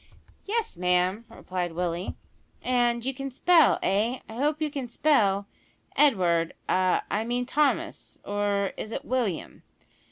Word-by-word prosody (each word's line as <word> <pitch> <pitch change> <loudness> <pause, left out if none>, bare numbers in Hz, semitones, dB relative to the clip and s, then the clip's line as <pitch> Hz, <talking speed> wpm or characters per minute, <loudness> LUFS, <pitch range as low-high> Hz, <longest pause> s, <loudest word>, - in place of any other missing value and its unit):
"Yes, 445 - -1
ma'am," 180 +4 +1
replied 180 -2 -4
Willie. 175 +1 -3 0.5
"And 240 -1 +1
you 265 - -1
can 275 +1 -5
spell 325 +5 +4
eh? 215 +6 +1
I - - -9
hope 295 +6 0
you 305 -2 -1
can 275 -4 -4
spell, 210 -8 +2 0.5
Edward, 175 - +3
a 185 0 +2
I 210 +2 0
mean 245 +2 -1
Thomas 290 +2 -1
is 205 +1 -1
it, - - -3
or - - -15
William?" 240 -9 -2
225 Hz, 135 wpm, -27 LUFS, 185-270 Hz, 0.5 s, spell